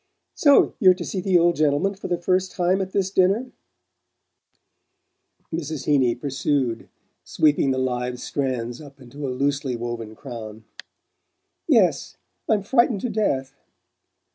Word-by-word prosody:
"So 285 -2 +4
you're 185 -5 +6
to 175 -2 -6
see 190 - -3
the 190 -1 +3
old 170 0 +3
gentleman 155 +6 +1
for 195 - -8
the 175 - 0
first 185 +2 0
time 180 +2 +1
at 190 0 -4
this 190 -1 -1
dinner?" 200 +7 +2 2.0
Mrs. 155 -3 -4
Heeny 130 -5 +2
pursued, 135 -2 -2 0.3
sweeping 150 -2 +2
the 130 - 0
live 125 -1 -2
strands 125 -2 -3
up 140 -1 -14
into 140 +3 -7
a - - -3
loosely 135 0 -1
woven 115 -2 -6
crown. 110 -5 -9 1.0
"Yes. - - +2 0.3
I'm 210 -3 +2
frightened 235 -2 +2
to 250 - -2
death!" 140 -12 -1
145 Hz, 135 wpm, -23 LUFS, 130-185 Hz, 2.0 s, you're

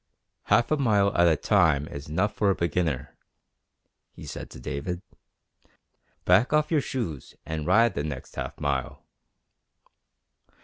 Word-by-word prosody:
"Half 120 +3 +3
a 155 - +3
mile 105 -7 +2
at 85 0 +5
a 80 - +4
time 80 -4 +2
is 70 +2 -8
enough 95 +7 0
for 105 - +1
a 95 - +2
beginner," 80 -5 -1 1.0
he - - -11
said - - -7
to - - -11
David. 85 +8 -4 1.2
"Back 95 +8 +4
off 150 +1 +2
your 155 -3 +3
shoes 105 - -5
and 80 -1 -4
ride 115 +4 +4
the 70 - -2
next 75 -4 -6
half - - -5
mile." 70 -3 -2
85 Hz, 140 wpm, -26 LUFS, 75-105 Hz, 1.2 s, at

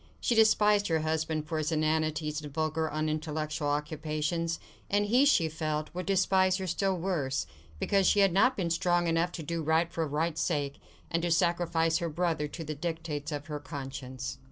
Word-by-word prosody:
She - - +1
despised 210 -2 +4
her 160 -2 +1
husband 160 0 -1
for 160 0 -2
his 155 +1 -1
inanities 155 -1 0
and 150 -1 -8
vulgar, 155 +1 -1
unintellectual 155 0 -2
occupations; 155 +3 -1 0.3
and 205 +1 +2
he, 245 +7 +4
she 175 - +4
felt, 155 -1 -3
would 180 +1 -5
despise 190 -1 +3
her 190 - -4
still 185 +2 0
worse, 160 -7 -1 0.3
because 195 - +2
she 205 - +4
had 195 -3 +4
not 250 +7 +4
been 175 -4 -1
strong 175 +1 +2
enough 165 +1 +1
to 165 - -5
do 170 +2 -3
right 160 +2 +1
for 165 -1 -1
right's 155 +3 -1
sake, 145 -4 -1 0.3
and 165 - +1
to 175 - 0
sacrifice 165 -1 +2
her 170 -2 -2
brother 160 -2 -1
to 165 +3 -7
the 155 0 -4
dictates 160 -1 -4
of 145 -1 -4
her 150 -1 -5
conscience. 130 -3 -6
160 Hz, 180 wpm, -30 LUFS, 150-175 Hz, 0.3 s, despised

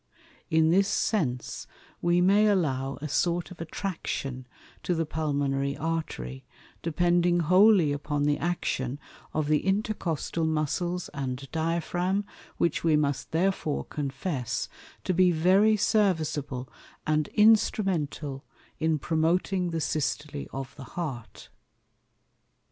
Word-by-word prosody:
In 160 0 +4
this 195 +3 +4
Sense 165 - -1 0.3
we 175 +1 +3
may 200 +4 +5
allow 135 -9 0
a - - -2
sort 175 +5 0
of 180 - -10
Attraction 150 -7 -4 0.3
to 180 - 0
the 165 0 0
Pulmonary 140 -3 -1
Artery, 150 - -3 0.4
depending 175 +1 +2
wholly 185 -1 +5
upon 145 0 -2
the 145 0 +2
Action 140 -6 -1 0.3
of 155 -1 -1
the 150 0 +3
Intercostal 190 -5 -1
Muscles 165 +3 -1
and 135 -1 -4
Diaphragm, 175 +4 0 0.3
which 170 -3 0
we 160 -2 +4
must 145 -2 0
therefore 165 -3 0
confess 135 -3 -3 0.4
to 185 - 0
be 180 +1 +5
very 190 +6 +4
serviceable 155 - 0 0.4
and 155 -1 +1
instrumental 185 -10 +2 0.4
in 160 0 +2
promoting 175 +4 +1
the 165 -1 -2
Systole 150 -1 -2
of 135 0 -6
the 140 - -8
Heart. 135 -10 -5
160 Hz, 115 wpm, -27 LUFS, 145-180 Hz, 0.4 s, may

